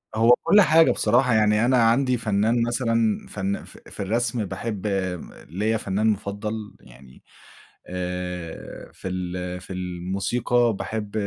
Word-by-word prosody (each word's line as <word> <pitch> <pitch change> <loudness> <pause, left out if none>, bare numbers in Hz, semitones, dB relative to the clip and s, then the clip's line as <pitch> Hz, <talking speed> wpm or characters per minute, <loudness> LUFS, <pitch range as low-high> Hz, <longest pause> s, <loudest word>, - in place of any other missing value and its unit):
هو 115 +2 +6
كُلّ 210 - +6
حاجة 165 -3 +5
بصراحة، 125 +3 +2
يعني 105 +1 +3
أنا 130 +1 +3
عندي 125 +2 +3
فنان 110 +1 +1
مثلًا 115 -2 0
فن 100 0 -3
ف - - -14
في - - -12
الرسم 115 +2 -1
باحب 100 +2 -4
م 95 -3 -3 0.2
ليّا 105 +7 0
فنان 105 +1 -1
مُفضل، 105 +1 -3
يعني 65 +1 -17 0.6
آآ 90 -2 -6
في - - -8
ال 90 0 -4
في - - -8
الموسيقى 95 +7 0
باحب 105 -2 -4
105 Hz, 135 wpm, -24 LUFS, 95-115 Hz, 0.6 s, هو